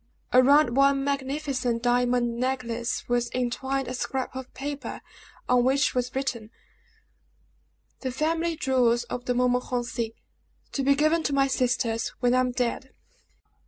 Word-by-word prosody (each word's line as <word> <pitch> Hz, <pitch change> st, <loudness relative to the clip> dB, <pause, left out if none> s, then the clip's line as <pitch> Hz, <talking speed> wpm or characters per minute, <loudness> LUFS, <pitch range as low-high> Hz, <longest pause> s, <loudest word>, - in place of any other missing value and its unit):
Around 255 Hz, 0 st, +5 dB
one 275 Hz, 0 st, +4 dB
magnificent 275 Hz, -3 st, -2 dB
diamond 245 Hz, -1 st, +1 dB
necklace 245 Hz, -2 st, -2 dB
was 240 Hz, 0 st, 0 dB
entwined 265 Hz, +2 st, -1 dB
a 255 Hz, -, -4 dB
scrap 260 Hz, 0 st, -3 dB
of 260 Hz, -1 st, -7 dB
paper, 285 Hz, +1 st, -5 dB, 0.5 s
on 250 Hz, -1 st, +4 dB
which 265 Hz, +2 st, +2 dB
was 250 Hz, 0 st, -2 dB
written: 250 Hz, -5 st, -3 dB, 1.5 s
"The 260 Hz, -, -3 dB
family 325 Hz, +5 st, 0 dB
jewels 245 Hz, -5 st, +2 dB
of 245 Hz, +1 st, -6 dB
the 245 Hz, -, 0 dB
Montmorencis. 245 Hz, -2 st, 0 dB, 0.6 s
To 275 Hz, -, -2 dB
be 280 Hz, +1 st, +4 dB
given 310 Hz, +3 st, +2 dB
to 290 Hz, -, -1 dB
my 275 Hz, 0 st, +4 dB
sisters 245 Hz, -3 st, 0 dB
when 245 Hz, -1 st, +2 dB
I 255 Hz, -, +4 dB
am 255 Hz, 0 st, +2 dB
dead." 250 Hz, +2 st, -3 dB
255 Hz, 135 wpm, -26 LUFS, 245-275 Hz, 1.5 s, Around